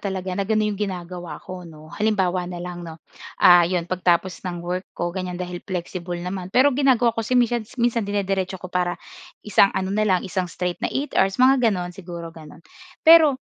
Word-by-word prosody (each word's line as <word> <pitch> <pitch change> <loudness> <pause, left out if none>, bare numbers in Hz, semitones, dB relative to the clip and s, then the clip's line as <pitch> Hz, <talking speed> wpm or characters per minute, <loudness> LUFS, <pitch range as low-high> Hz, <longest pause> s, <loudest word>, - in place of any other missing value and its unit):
talaga 190 -2 -4
na 195 +2 -2
gano'n 215 -1 +1
'yong 205 - -8
ginagawa 175 -4 -5
ko, 185 0 -7
'no. 155 0 -14
Halimbawa 190 -4 0
na 180 - -6
lang 175 0 -6
'no, 165 -2 -8 0.5
ah, 175 -2 +9
'yon 180 -2 -1
pagtapos 180 0 0
ng 175 -1 -6
work 180 +2 -4
ko 175 0 -2
ganyan 185 -1 -4
dahil 180 -1 -5
flexible 180 -1 -5
naman, 180 +1 -5
pero 260 +8 +4
ginagawa 250 -3 +3
ko 225 - -3
kasi 240 +3 0
minsan 240 -2 +1
minsan 235 -1 +1
dinidiretso 195 -2 -1
ko 185 0 -10
para 180 -1 0 0.5
isang 205 -1 +5
ano 190 0 -1
na 215 +1 +1
lang 185 -2 +3
isang 185 -1 -2
straight 180 +1 -4
na - - -1
8 285 +2 -3
hours, 195 0 +2
mga 255 -2 +5
gano'n, 180 -3 -2
siguro 170 -2 -8
gano'n. 160 0 -14 0.4
Pero 320 -4 +7
185 Hz, 195 wpm, -22 LUFS, 175-210 Hz, 0.5 s, ah